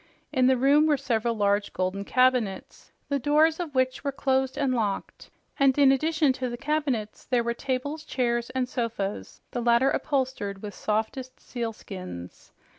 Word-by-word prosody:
In 255 -1 +4
the 260 0 +4
room 285 +4 +4
were 295 -2 +3
several 235 -4 0
large, 205 -1 +1
golden 185 +2 -2
cabinets, 250 -6 0 0.2
the 280 -1 +1
doors 310 +4 +3
of 320 -6 -5
which 260 0 +1
were 280 - -1
closed 265 -1 0
and 275 -3 +1
locked, 210 -5 -3 0.3
and 275 -1 +4
in 280 -2 +6
addition 305 0 +2
to 255 -1 -3
the 240 - -5
cabinets 270 -7 -2
there 245 -2 +1
were 235 0 -1
tables, 275 +5 -3
chairs 240 -4 -1
and 255 -1 -1
sofas, 230 -5 -4
the 245 - -2
latter 235 +3 +4
upholstered 260 -9 -2
with 205 -1 -6
softest 225 +5 -3
sealskins. 195 - -7
255 Hz, 160 wpm, -26 LUFS, 225-275 Hz, 0.3 s, in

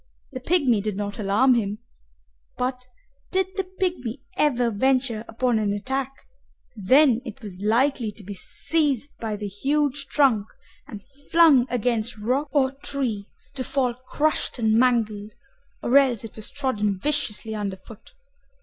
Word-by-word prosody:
The 260 - -5
pygmy 260 - +2
did 210 -1 -3
not 205 +1 -4
alarm 215 +6 +4
him, 210 -3 0 0.8
but 250 0 -3 0.4
did 380 0 +1
the 385 - 0 0.2
pygmy 285 - -2
ever 245 -5 +2
venture 250 0 +1
upon 235 0 0
an 210 -2 0
attack, 265 +6 -2 0.6
then 245 +4 +4
it 235 0 -9
was 190 -4 -8
likely 235 +2 +2
to 210 - -13
be 200 +2 -7
seized 285 - -2
by 220 -2 -3
the 210 0 -6
huge 280 +6 -1
trunk 250 -9 +3 0.4
and 210 -8 -9 0.3
flung 310 -7 +6
against 240 -1 -1
rock 255 +8 0
or 270 -2 +2
tree, 265 -7 -4 0.2
to 265 -2 -3
fall 255 -2 0
crushed 290 +6 -1
and 220 -2 +2
mangled, 220 -3 +1 0.5
or 245 - +1
else 250 -6 +1
it 225 - -9
was 215 - -7
trodden 235 -8 -1
viciously 225 -3 -1
under 200 -3 -3
foot. 215 - -15
245 Hz, 145 wpm, -24 LUFS, 215-275 Hz, 0.8 s, flung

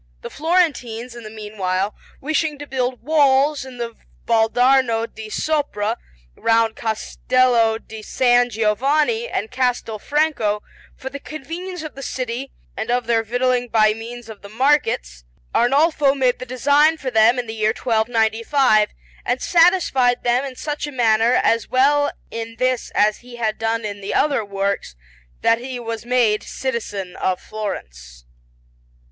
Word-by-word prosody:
The - - -7
Florentines, 275 -8 0
in 235 - -9
the 215 - -9
meanwhile, 210 -2 -3 0.3
wishing 310 +1 -1
to 290 - -8
build 255 -3 -2
walls 285 -1 +3
in 260 -2 -10
the 235 -1 -5 0.3
Valdarno 230 +1 +3
di 220 -1 -10
Sopra 255 -6 -1 0.4
round 225 -1 +2
Castello 230 +1 +1
di 220 -1 -10
San 245 +2 +2
Giovanni 280 - +1
and 215 - -3
Castel 250 -4 -1
Franco, 285 -8 0 0.3
for 265 - -7
the 280 - -6
convenience 330 +5 -7
of 310 - -7
the 275 - -9
city 255 0 -4 0.2
and 220 - -4
of 245 0 +1
their 230 -1 +2
victualling 245 +2 0
by 215 -2 +3
means 230 +1 -9
of 220 -2 -11
the 200 - -11
markets, 225 - +1 0.3
Arnolfo 280 +3 +3
made 255 -3 +1
the 255 - -7
design 285 +6 +3
for 270 -4 -4
them 225 +2 +5
in 245 - -2
the 220 - -6
year 215 -1 +1
1295, 225 0 +2 0.3
and 245 +1 -1
satisfied 330 -9 +3
them 245 +2 +2
in 270 -2 -6
such 295 +2 -4
a - - -6
manner, 230 -1 +3
as 230 -2 +2
well 285 +3 +3 0.2
in 230 0 -6
this 255 0 0
as 210 0 +3
he 245 0 -13
had 220 -2 -2
done 225 0 -1
in 205 -1 -5
the 195 - -3
other 285 -7 +2
works, 200 - -3 0.5
that 230 - +4
he 250 0 -6
was 230 -1 -6
made 240 -4 +2
citizen 205 -8 -4
of 185 -1 -1
Florence. - - -7
240 Hz, 150 wpm, -21 LUFS, 220-270 Hz, 0.5 s, them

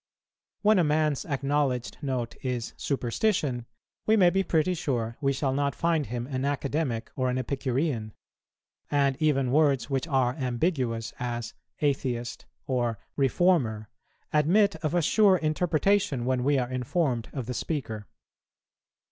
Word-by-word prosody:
When 210 -1 +5
a - - +4
man's 150 -2 +1
acknowledged 140 -3 -1
note 130 -4 -2
is 125 -3 -3
superstition, 130 - -1 0.4
we 220 +1 +5
may 180 -4 +6
be 195 - +2
pretty 180 -1 +1
sure 120 -8 -2
we 140 -1 +2
shall 135 0 0
not 140 0 0
find 165 -4 +1
him 120 0 -3
an 130 -1 -3
Academic 140 -3 -1
or 130 -1 0
an 125 - 0
Epicurean; 130 -2 -1 0.8
and 140 -2 +2
even 135 -5 +2
words 140 -2 +2
which 135 +4 0
are 130 -5 +2
ambiguous, 125 -3 -1
as 120 -1 -3 0.3
"atheist," 130 -5 -1 0.2
or 120 -4 0 0.2
"reformer," 135 - +2 0.4
admit 185 +7 +4
of 160 +1 -2
a 175 - +2
sure 195 +2 +5
interpretation 160 -2 +1
when 130 -1 +1
we 140 +1 +3
are 125 -1 -1
informed 130 -1 -1
of 130 -4 -4
the 125 - -4
speaker. 115 -8 -4
135 Hz, 140 wpm, -27 LUFS, 125-155 Hz, 0.8 s, may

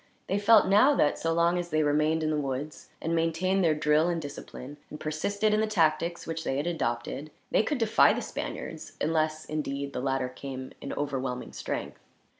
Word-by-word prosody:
They 195 +2 0
felt 215 +1 +6
now 210 +10 +5
that, 145 - +2
so 165 - 0
long 170 +2 +2
as 175 -1 -4
they 155 -1 +2
remained 150 +2 +2
in 155 - +1
the 150 -1 0
woods, 140 +2 -5
and 165 - -2
maintained 165 +4 +1
their 160 -2 +3
drill 150 +2 +3
and 170 -1 0
discipline, 145 -1 -8
and 150 - -8
persisted 200 +8 0
in 215 - +3
the 220 - +1
tactics 170 -3 +1
which 165 0 -4
they 135 - -1
had 145 - -1
adopted, 140 -3 -2 0.2
they - - +4
could 290 +6 -1
defy 225 -2 +5
the - - -2
Spaniards; - - -6
unless, 155 -1 0
indeed, 140 -2 -3
the - - -3
latter 135 -1 0
came 130 0 -7
in - - -5
overwhelming 130 - -3
strength. 65 -1 -5
155 Hz, 195 wpm, -28 LUFS, 140-175 Hz, 0.2 s, felt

